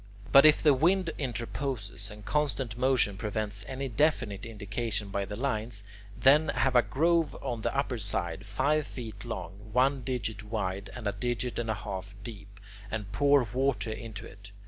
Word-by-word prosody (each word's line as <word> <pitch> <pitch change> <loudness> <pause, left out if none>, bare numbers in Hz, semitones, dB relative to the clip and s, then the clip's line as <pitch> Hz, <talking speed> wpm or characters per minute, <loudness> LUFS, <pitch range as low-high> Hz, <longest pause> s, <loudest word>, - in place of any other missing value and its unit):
But 140 +2 +9
if 150 - +5
the 150 -2 +7
wind 170 +5 +3
interposes, 120 -5 -4
and 105 0 -11
constant 135 -6 0
motion 125 -5 +2
prevents 105 0 -3
any 135 +1 -3
definite 120 -6 +1
indication 105 -1 -3
by 100 0 -1
the 105 - -6
lines, 110 -4 -2 0.4
then 150 +4 +6
have 130 -2 +1
a 120 - +8
groove 165 +2 +2
on 120 -4 -3
the 135 - -1
upper 135 -4 0
side, 95 -3 -2
five 140 +9 +1
feet 115 -4 -7
long, 100 +5 -6
one 135 +2 +3
digit 120 -4 -3
wide, 100 -3 -3
and 120 -3 -7
a - - +2
digit 120 +4 -2
and 115 -1 -2
a 110 - +1
half 95 -2 -6
deep, 100 -3 -10 0.3
and 105 -2 -4
pour 140 +4 +4
water 125 -5 +1
into 110 -2 -7
it. 100 +1 -12
115 Hz, 170 wpm, -30 LUFS, 105-135 Hz, 0.4 s, But